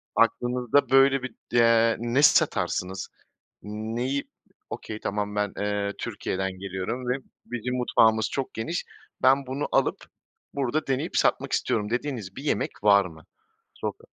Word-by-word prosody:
aklınızda, 120 +3 +2
böyle, 135 0 +5
bir, 120 -4 -6 0.2
eee, 115 -1 +5
ne 120 +4 +1
satarsınız? 95 -8 +2 0.5
Neyi, 115 +6 -3 0.5
okay, 110 0 -6
tamam, 105 0 -3
"Ben, 105 -1 0
eee, 105 0 -1
Türkiye'den 95 0 -3
geliyorum 100 +6 -4
ve 125 - +2 0.3
bizim 120 +1 -3
mutfağımız 110 -3 +3
çok 135 -2 -3
geniş, 165 +11 -3 0.4
ben 135 +1 +4
bunu 135 +3 -3
alıp, - - +2 0.6
burada 140 +2 -1
deneyip 135 -1 -1
satmak - - +2
istiyorum." 105 -1 0
dediğiniz 120 -6 -3
bir 135 - -7
yemek 120 -8 0
var 100 -1 +6
mı? 80 -2 -12 0.5
Soka - - -5
115 Hz, 130 wpm, -26 LUFS, 105-130 Hz, 0.6 s, var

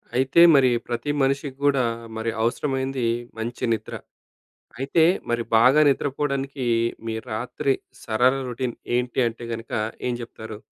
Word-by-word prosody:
అయితే, 135 +6 +4
మరి 135 -2 +5 0.2
ప్రతి 120 +4 -2
మనిషికి 135 0 0
గూడా, 140 -3 +3 0.3
మరి 115 +1 -1
అవసరమైంది 130 +1 -1 0.3
మంచి 115 +2 -5
నిద్ర. 110 - -5 0.8
అయితే, 140 +5 +2 0.3
మరి 120 0 0
బాగా 130 +6 +6
నిద్రపోడానికి 140 -1 -2 0.4
మీ 110 - -2 0.2
రాత్రి 125 +4 -1 0.3
సరళ 125 +3 +3 0.2
రొటీన్ 125 0 -3 0.2
ఏంటంటే 120 -1 -1
గనక 115 0 -8 0.4
ఏం 125 - 0
జెప్తారు? 110 -2 -8
130 Hz, 120 wpm, -24 LUFS, 115-135 Hz, 0.8 s, బాగా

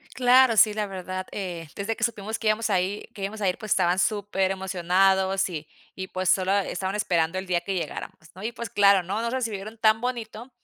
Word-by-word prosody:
Claro, 255 -1 +5
sí, 215 0 +6
la 210 -1 -1
verdad, 185 0 -5
eh, 175 -5 -5
desde 205 +3 -2
que 230 - -13
supimos 220 -2 -2
que 220 - 0
íbamos 215 +1 +1
a 190 -4 +2
ir 195 +3 -4
que 200 - -9
íbamos 210 +3 -4
a 200 - +1
ir, 180 - 0
pues, 215 - -8
estaban 180 -1 +2
superemocionados, 190 -1 +1
y 155 -4 -7 0.3
y 190 0 -6
pues, 185 -1 -2
solo 190 0 +2
estaban 190 0 -2
esperando 175 -3 0
el 190 - -5
día 180 -1 +1
que 195 +2 -4
llegáramos, 180 - -5 0.2
¿no? 185 - -11
Y 225 - -2
pues 235 0 -6
claro, 200 -2 +5
¿no? 200 +5 -2
Nos 235 0 -2
recibieron 220 -4 -4
tan 220 0 +4
bonito, 240 -1 -5
195 Hz, 215 wpm, -25 LUFS, 185-220 Hz, 0.3 s, sí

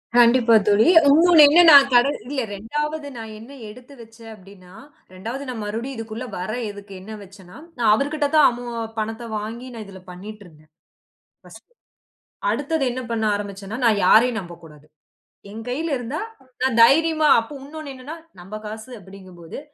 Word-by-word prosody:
கண்டிப்பா 235 -1 +5
தோழி, 210 +5 +4 0.2
உன்னொன்னு 325 +1 +6
என்னன்னா, 325 0 +7 0.2
கடன் 245 +4 +3
இல்ல, 275 -1 -3
2வது 295 +8 -4
நான் 225 -1 -8
என்ன 235 +5 -13 0.2
எடுத்து 250 +5 -14
வச்சேன், 225 0 -15
அப்பிடீன்னா, 190 -2 -17 0.4
2வது 230 +9 -7
நான் 225 -4 -6
மறுபடியும் 230 +6 -5
இதற்குள்ள 225 +2 -7
வர 185 +4 -5 0.2
எதுக்கு 205 -1 -11
எண்ணம் 215 +1 -10
வைச்சேன்னா, 190 +1 -16 0.2
நான் 230 -3 +2
அவருகிட்ட 290 +3 -1
தான் 305 - +6
அமௌ 245 +1 -8 0.3
பணத்த 225 +2 -5
வாங்கி, 230 +4 -7
நான் 220 -2 -8
இதில 190 -1 -13
பண்ணிட்டுருந்தேன். 180 -5 -13 0.8
பர்ஸ்ட்டு. 485 - -17 0.8
அடுத்தது 290 +1 -2
என்ன 255 +1 -5
பண்ண 225 -1 -2
ஆரம்பிச்சேன்னா, 200 +1 -7
நான் 210 -4 +2
யாரையும் 230 +3 +4
நம்பக்கூடாது. 165 -4 -14 0.7
என் 225 +1 -9
கையில 310 +6 -3
இருந்தா, 255 +7 -5 0.4
நான் 260 -3 0
தைரியமா 315 +4 +4
அப்போ, 255 +6 -10
உன்னொன்னு 300 0 -9
என்னன்னா, 285 +6 -9 0.3
நம்ப 195 +4 -9
காசு 220 +3 -9
அப்பிடீங்கம்போது, 185 0 -12
225 Hz, 145 wpm, -21 LUFS, 205-275 Hz, 0.8 s, என்னன்னா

